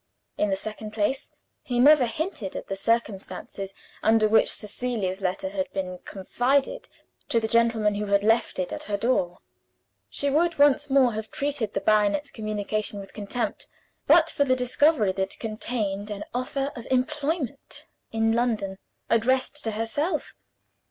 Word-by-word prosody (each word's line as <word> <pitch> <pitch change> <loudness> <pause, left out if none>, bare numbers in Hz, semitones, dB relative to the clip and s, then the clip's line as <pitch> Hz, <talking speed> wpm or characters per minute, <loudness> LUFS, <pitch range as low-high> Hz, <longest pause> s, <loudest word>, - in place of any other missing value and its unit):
In 210 - +1
the 195 - +2
second 215 +2 -7
place, 225 +6 -1 0.3
he 245 -1 -2
never 280 -1 +7
hinted 305 - -4
at - - -5
the 195 - -1
circumstances 195 -2 -2 0.3
under 220 0 +4
which 220 +1 +4
Cecilia's 210 -3 -3
letter 190 0 -1
had 190 -1 -3
been 185 -2 -3
confided 260 - 0 0.4
to 230 - +3
the 220 - -1
gentleman 230 -2 +3
who 205 0 -3
had 200 0 +3
left 225 +2 +2
it 185 -1 -2
at - - -6
her 205 -1 -1
door. 200 -6 0 0.7
She 285 - -2
would 330 +3 +2
once 290 0 +4
more 265 -3 +4
have 220 0 -5
treated 275 -7 -2
the 195 - 0
baronet's 215 +8 +2
communication 215 -1 -2
with 195 -1 -10
contempt 215 +4 -3 0.4
but 320 +2 +6
for 285 - +2
the 255 -2 +2
discovery 255 -3 +3
that 190 +1 -2
it - - -22
contained 215 -2 -3
an 205 -1 -4
offer 270 +3 -2
of 240 - -8
employment 280 +1 -2 0.3
in 225 0 +2
London, 220 -5 0 0.3
addressed 260 +5 +1
to - - +1
herself. 285 - -2
225 Hz, 155 wpm, -26 LUFS, 205-265 Hz, 0.7 s, never